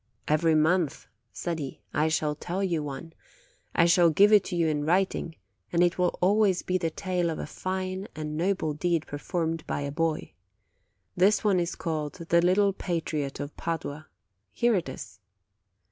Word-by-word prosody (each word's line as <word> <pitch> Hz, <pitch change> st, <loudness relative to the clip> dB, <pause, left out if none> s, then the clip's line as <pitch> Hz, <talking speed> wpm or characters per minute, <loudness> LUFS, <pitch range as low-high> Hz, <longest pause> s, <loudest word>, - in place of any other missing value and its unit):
"Every 160 Hz, +1 st, +3 dB
month/' 160 Hz, 0 st, +2 dB, 0.3 s
said 170 Hz, -2 st, -3 dB
he, 135 Hz, -3 st, -6 dB
"I 155 Hz, -, +2 dB
shall 155 Hz, -1 st, 0 dB
tell 180 Hz, +5 st, -3 dB
you 170 Hz, -5 st, 0 dB
one; 150 Hz, +3 st, -7 dB, 0.6 s
I 170 Hz, -, +5 dB
shall 170 Hz, 0 st, +5 dB
give 205 Hz, +7 st, +5 dB
it 205 Hz, -2 st, +7 dB
to 180 Hz, -, -4 dB
you 170 Hz, -1 st, +2 dB
in 150 Hz, -2 st, 0 dB
writing, 175 Hz, 0 st, 0 dB, 0.4 s
and 175 Hz, 0 st, +3 dB
it 175 Hz, +1 st, +1 dB
will 180 Hz, -1 st, +1 dB
always 200 Hz, -1 st, +3 dB
be 185 Hz, 0 st, 0 dB
the 165 Hz, -2 st, 0 dB
tale 180 Hz, 0 st, -1 dB
of 160 Hz, -, -3 dB
a -, -, -4 dB
fine 185 Hz, +1 st, -4 dB
and 150 Hz, -1 st, -4 dB
noble 170 Hz, -2 st, 0 dB
deed 165 Hz, +1 st, 0 dB
performed 165 Hz, +2 st, -3 dB
by -, -, -2 dB
a 140 Hz, 0 st, -3 dB
boy. 160 Hz, +1 st, -1 dB, 0.8 s
This 195 Hz, +4 st, +3 dB
one 200 Hz, -4 st, +3 dB
is 170 Hz, 0 st, -2 dB
called 155 Hz, -3 st, -3 dB
The 170 Hz, -1 st, +1 dB
Little 195 Hz, +3 st, +3 dB
Patriot 160 Hz, -6 st, -3 dB
of 145 Hz, +1 st, -6 dB
Padua. 155 Hz, -2 st, -4 dB, 0.4 s
Here 235 Hz, -, +2 dB
it 175 Hz, -9 st, 0 dB
is. 110 Hz, -, -9 dB
170 Hz, 175 wpm, -27 LUFS, 155-185 Hz, 0.8 s, it